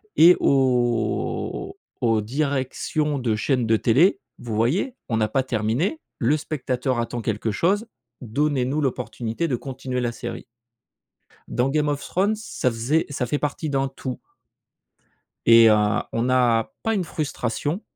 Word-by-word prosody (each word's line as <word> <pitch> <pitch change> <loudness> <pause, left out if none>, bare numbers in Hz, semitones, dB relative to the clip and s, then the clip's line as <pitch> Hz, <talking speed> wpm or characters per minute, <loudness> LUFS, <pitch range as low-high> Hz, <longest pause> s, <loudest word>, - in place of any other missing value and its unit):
et 175 +2 +8
aux 120 -5 0 0.3
aux 115 -2 +2
directions 140 +3 -1
de 115 -4 0
chaîne 125 +2 0
de 110 0 +4
télé: 160 - +3 0.2
«Vous 115 -3 -5
voyez 145 - +1
on 115 - +1
n'a 110 -1 +2
pas 135 +4 0
terminé. 125 - -1 0.2
Le 150 - +2
spectateur 130 -4 -2
attend 120 0 -3
quelque 110 0 -1
chose. 195 - +1 0.4
Donnez-nous 135 +3 0
l'opportunité 125 +1 -2
de 135 - 0
continuer 130 0 -4
la 120 -1 -1
série». 120 0 -7 1.0
Dans 125 +2 0
Game 150 +1 +1
of 145 -1 -2
Thrones 200 +4 0
ça 210 - -2
faisait 120 +8 0
ça 140 -3 -2
fait 145 - 0
partie 150 +1 -2
d'un 135 -1 0
tout. 135 -1 -6 1.3
Et 115 -1 +8
heu, 105 - +6 0.4
on 115 +2 0
a 120 -3 +2
pas 225 - +1
une 190 - 0
frustration. 150 - -3
130 Hz, 145 wpm, -23 LUFS, 115-150 Hz, 1.3 s, et